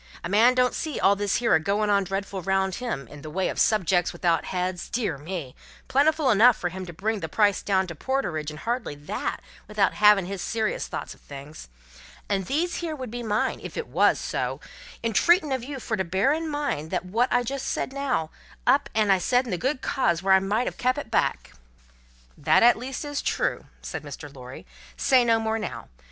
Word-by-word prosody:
A 170 - -4
man 230 +6 +5
don't 250 0 +3
see 310 -3 -3
all 200 - +4
this 200 -1 -1
here 235 -1 +2
a - - +6
goin' 205 +5 0
on 200 -1 +3
dreadful 195 0 -4
round 190 +1 0
him, 220 - -3
in 145 +3 -12
the 155 - -8
way 185 +4 -1
of - - -4
Subjects 180 -4 +2
without 170 -2 0
heads, 180 -1 -3
dear 225 -9 -1
me, 155 -4 -6 0.3
plentiful 295 0 +3
enough 230 +3 +6
fur 175 - -2
to 185 -1 -6
bring 210 +6 -2
the 160 - -5
price 205 +2 +2
down 190 -2 +1
to 175 - -7
porterage 160 - -2
and 155 0 -9
hardly 235 - -2
that, 145 +1 -4 0.3
without 210 -2 +1
havin' 210 -3 +5
his 195 0 -5
serious 220 +2 -2
thoughts - - -5
of - - -22
things. 140 - -10 0.6
And 195 -3 -1
these 335 +5 0
here 330 -3 -3
would 255 -5 -7
be 240 0 -5
mine, 215 -2 0
if - - -8
it 470 - -2
wos - - +3
so, - - -3 0.4
entreatin' 305 - +3
of 260 -3 -2
you 275 +1 -6
fur 220 -3 -3
to 190 - 0
bear 190 - +2
in 320 +1 -3
mind 290 - -2
that - - -2
wot 230 +7 +1
I 245 - +3
said - - -9
just 270 +1 -3
now, 270 - -1 0.3
I - - +6
up 280 +1 0
and 200 -4 +3
said 250 +6 +2
in 235 - -6
the 180 - 0
good 265 +1 -1
cause 175 -10 0
when 195 0 +4
I 190 - +7
might 205 +6 0
have - - -4
kep' 255 +2 +1
it 280 -6 -6
back." - - 0 0.8
"That 155 +6 +3
at 240 +1 +7
least 260 +5 -5
is 290 -1 -3
true," - - -1 0.2
said - - -5
Mr. - - -9
Lorry. - - -10 0.3
"Say 260 -2 +4
no 230 -1 +3
more 220 0 -1
now. 210 - -6
210 Hz, 215 wpm, -25 LUFS, 185-255 Hz, 0.8 s, I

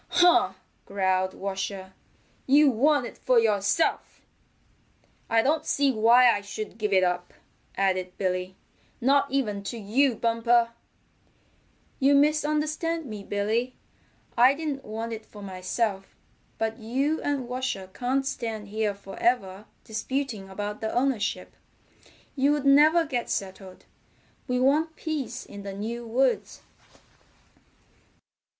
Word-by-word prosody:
"Huh!" 355 0 +4 0.3
growled 190 -1 0
Washer. 190 -1 -5 0.5
"You 285 +1 +6
want 280 +3 +2
it - - -10
for 255 -1 +2
yourself." 210 +6 0 1.1
"I 225 0 +3
don't 300 +3 +1
see 280 -1 +2
why 235 +2 +5
I 205 - -3
should 210 +2 -7
give 210 -1 -1
it 190 -1 +4
up," 180 0 -2 0.4
added 185 -2 0
Billy, 185 0 -2 0.4
"not 275 +3 +3
even 220 -7 -1
to 235 - -4
you, 235 +5 +1
Bumper." 230 +1 +2 1.3
"You 280 +1 +4
misunderstand 305 +2 +1
me, 215 -5 -7
Billy. 220 +6 -1 0.6
I 250 +3 +6
didn't 290 -3 -4
want 225 +2 -5
it 220 0 -7
for 205 -1 -13
myself, 195 +2 -3 0.4
but 225 0 -2
you 270 +8 -1
and 280 -4 -2
Washer 250 -6 -3
can't 265 +2 -1
stand 220 -5 -4
here 210 -1 -1
forever 200 0 -2 0.2
disputing 225 -2 -4
about 205 +2 -5
the 220 - -2
ownership. 250 -3 -1 0.8
You'd 285 +1 +1
never 305 +4 +6
get 250 -5 -3
settled. 190 -1 -5 0.6
We 250 -1 0
want 305 +5 +2
peace 280 -6 -4
in 205 - -10
the 200 -1 -6
new 230 +4 -5
woods." 255 +3 0
230 Hz, 120 wpm, -26 LUFS, 200-275 Hz, 1.3 s, You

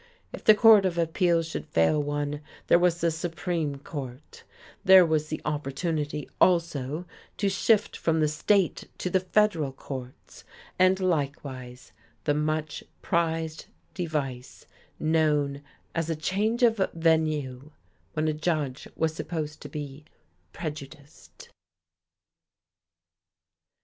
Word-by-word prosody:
If - - -8
the 215 - +7
Court 220 -2 +7
of 180 -2 -1
Appeals 170 0 +2
should 160 - -5
fail 80 - +2
one, 145 0 -3 0.2
there 170 - +5
was 175 -1 +2
the 170 0 +2
Supreme 165 -2 -2
Court; 135 -1 -8 0.4
there 190 -2 +8
was 155 -2 0
the 155 - -4
opportunity, 150 0 -2
also, 165 -3 +2 0.3
to 200 - +1
shift 205 +2 +2
from 160 -1 0
the 155 - +3
state 180 +5 +1
to 180 - -3
the 190 - +3
federal 185 -6 +1
courts; 130 -1 -9 0.4
and 185 +1 +4
likewise 140 -7 -3 0.3
the 145 - +2
much 155 0 -2 0.2
prized 160 -2 -1 0.3
device 145 -8 -4 0.3
known 150 -3 +1 0.3
as 165 -1 -2
a 165 - 0
change 210 +9 0
of 225 -2 +5 0.2
venue, 155 -5 0 0.4
when 155 0 0
a 155 - +1
judge 150 -4 -2
was 160 -1 0
supposed 155 -2 -5
to 145 - -8
be 145 0 -7 0.5
"prejudiced." 150 -2 -9
155 Hz, 120 wpm, -27 LUFS, 145-170 Hz, 0.5 s, there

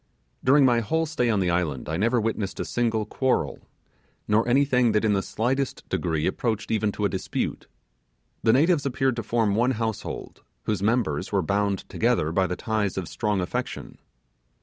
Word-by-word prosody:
During 140 +2 +5
my 120 -2 +4
whole 160 +9 0
stay 150 -6 0
on 105 -3 +2
the 90 -1 +1
island 85 -7 -1
I 80 - -2
never 115 +7 +2
witnessed 110 -3 -2
a - - -2
single 115 -3 0
quarrel, 130 +4 0 0.7
nor 110 +3 +2
anything 125 -2 +3
that 105 +1 +2
in 105 - +3
the 100 - +1
slightest 130 +6 -2
degree 80 -3 -1
approached 110 +1 -1
even 110 -1 +1
to 105 - -1
a - - +5
dispute. 95 - -3 0.7
The 110 - +4
natives 150 +2 +3
appeared 135 -1 0
to - - -1
form 110 -1 +1
one 120 +5 +2
household, 110 -2 -4 0.2
whose 105 -4 -1
members 100 -7 0
were 100 -2 +1
bound 100 +2 0
together 75 +1 +1
by 95 +2 +2
the 90 - -2
ties 110 -2 -1
of 90 -3 -3
strong 105 -1 -1
affection. 90 - -4
110 Hz, 175 wpm, -25 LUFS, 95-125 Hz, 0.7 s, During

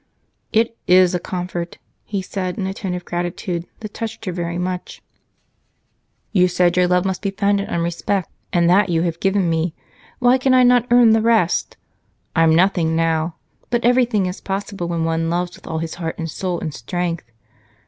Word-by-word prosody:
"It 230 +1 +2
is 180 0 +5
a 180 - 0
comfort!" 175 -1 -5 0.3
he 200 -2 -3
said, 185 -1 -4
in 195 - -2
a 190 - -2
tone 190 -2 -4
of 180 - -7
gratitude 175 0 -3
that 215 -2 -7
touched 225 -1 -6
her 185 - -2
very 170 -1 -3
much. 180 0 -4 1.3
"You 185 -3 +4
said 180 -1 +2
your 180 0 +4
love 180 +1 +2
must 190 -1 -2
be 200 - -1
founded 200 0 0
on 170 - -1
respect, 170 +2 -1 0.2
and 170 -1 +3
that 190 +3 +4
you 165 -1 +1
have 170 -1 -2
given 195 -1 +1
me 165 0 0 0.4
why 250 +1 +4
can 260 0 +3
I 255 - +6
not 245 -1 +4
earn 240 -1 +6
the 220 0 +4
rest? 220 -7 +2 0.6
I'm 160 -1 +4
nothing 170 -2 +2
now, 165 0 0 0.3
but 240 -1 0
everything 245 -5 +3
is 180 +1 -5
possible 195 -2 -4
when 170 -1 -1
one 165 0 0
loves 175 +1 -2
with - - -16
all 160 - -3
his 160 0 -3
heart 165 -1 -3
and 165 - -3
soul 180 0 -3
and 155 - -4
strength. 165 0 -4
180 Hz, 190 wpm, -20 LUFS, 170-200 Hz, 1.3 s, I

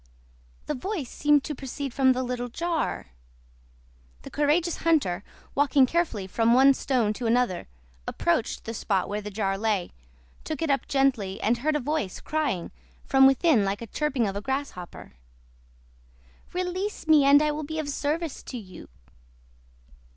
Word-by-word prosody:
The - - -2
voice 300 - -4
seemed 295 -1 +3
to 300 - -4
proceed 270 -1 -6
from 260 -1 +4
the 255 +1 -2
little 245 -1 -3
jar. 335 - -2 1.1
The - - -10
courageous 315 +4 +1
hunter, 265 - +1 0.3
walking 280 -1 +4
carefully 285 - -1
from 230 +5 +2
one 270 +2 +7
stone 245 -6 0
to 235 +2 -4
another, 235 -6 +1 0.4
approached 335 -9 -1
the 225 - -5
spot 195 -4 -1
where 205 +1 -3
the 210 - -6
jar 195 -1 -2
lay, 210 -4 0 0.5
took 310 -1 -4
it 315 - +1
up 275 - 0
gently, 260 -9 +1
and 235 +2 +1
heard 305 +4 0
a - - +2
voice 285 -8 -2
crying 285 - -2 0.3
from 270 -1 +6
within 270 - +4
like 195 +1 -1
the 230 - -7
chirping 260 -1 -1
of 195 - -4
a 200 - -3
grasshopper— 265 -8 -5 1.4
"Release 365 +1 -3
me, 310 -2 +6
and 280 +1 +7
I 300 0 +1
will 300 +1 -4
be 315 +2 -5
of 310 -2 -2
service 300 +2 -2
to 255 - -7
you." 190 -5 -11
270 Hz, 160 wpm, -26 LUFS, 220-300 Hz, 1.4 s, one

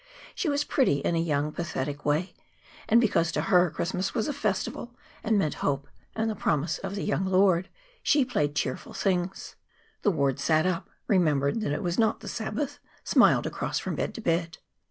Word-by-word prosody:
She 370 - -1
was 285 0 +1
pretty 265 - +2
in - - 0
a 165 - +1
young, 150 -2 0
pathetic 145 -4 -4
way, 150 +5 0 0.6
and 230 - +6
because 170 -8 +2
to - - 0
her 180 -1 +4
Christmas 185 +6 -2
was 225 - 0
a 295 - -1
festival 235 0 -3 0.3
and 220 -1 +2
meant 155 -7 +1
hope 140 0 -1 0.3
and 225 0 0
the 220 - 0
promise 160 -5 0
of 195 0 -5
the 200 - -3
young 205 - 0
Lord, 190 -1 +3 0.3
she 290 -3 +3
played 150 - -1
cheerful 130 -2 -3
things. 185 -1 -2 0.4
The - - +3
ward 140 -6 +1
sat 155 +3 +2
up, 180 -2 -1 0.2
remembered 155 -1 +2
that 210 - -1
it 145 - -2
was 175 +2 -1
not 220 -1 +2
the - - -9
Sabbath, 250 +6 -3 0.2
smiled - - +4
across - - -2
from - - -3
bed - - -3
to 230 - -6
bed. 165 -3 0
180 Hz, 190 wpm, -27 LUFS, 155-215 Hz, 0.6 s, and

